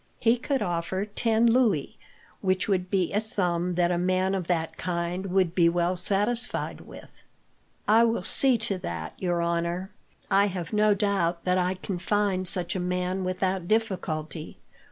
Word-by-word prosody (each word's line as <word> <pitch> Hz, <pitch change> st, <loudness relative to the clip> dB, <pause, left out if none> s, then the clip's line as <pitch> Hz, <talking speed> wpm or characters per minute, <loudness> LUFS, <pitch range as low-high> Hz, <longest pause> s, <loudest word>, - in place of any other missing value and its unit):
He 230 Hz, +1 st, +3 dB
could 270 Hz, +2 st, -1 dB
offer 175 Hz, +3 st, -2 dB
ten 220 Hz, +2 st, +1 dB
louis, 230 Hz, -, +2 dB, 0.4 s
which 185 Hz, -1 st, 0 dB
would 185 Hz, -3 st, 0 dB
be 185 Hz, -2 st, 0 dB
a 210 Hz, -, +2 dB
sum 180 Hz, -5 st, 0 dB
that 175 Hz, 0 st, +2 dB
a 175 Hz, -, 0 dB
man 185 Hz, +1 st, +1 dB
of 185 Hz, -3 st, -2 dB
that 165 Hz, -2 st, -1 dB
kind 175 Hz, +2 st, -3 dB
would 185 Hz, -2 st, +1 dB
be 170 Hz, -2 st, +4 dB
well 175 Hz, +1 st, 0 dB
satisfied 210 Hz, +7 st, 0 dB
with." -, -, -13 dB, 0.8 s
"I 225 Hz, +2 st, +6 dB
will 230 Hz, 0 st, 0 dB
see 265 Hz, -3 st, +4 dB
to 200 Hz, -4 st, -1 dB
that, 85 Hz, -, -5 dB
your 175 Hz, -2 st, 0 dB
honour. 170 Hz, +3 st, -2 dB, 0.4 s
I 200 Hz, +1 st, +4 dB
have 180 Hz, -3 st, -5 dB
no 210 Hz, 0 st, +4 dB
doubt 185 Hz, -4 st, 0 dB
that 180 Hz, 0 st, +1 dB
I 180 Hz, +1 st, 0 dB
can 185 Hz, -1 st, -5 dB
find 190 Hz, 0 st, +1 dB
such 180 Hz, 0 st, 0 dB
a -, -, -1 dB
man 180 Hz, +1 st, -2 dB
without 185 Hz, -1 st, -1 dB
difficulty. 170 Hz, -8 st, -2 dB
185 Hz, 165 wpm, -26 LUFS, 175-205 Hz, 0.8 s, I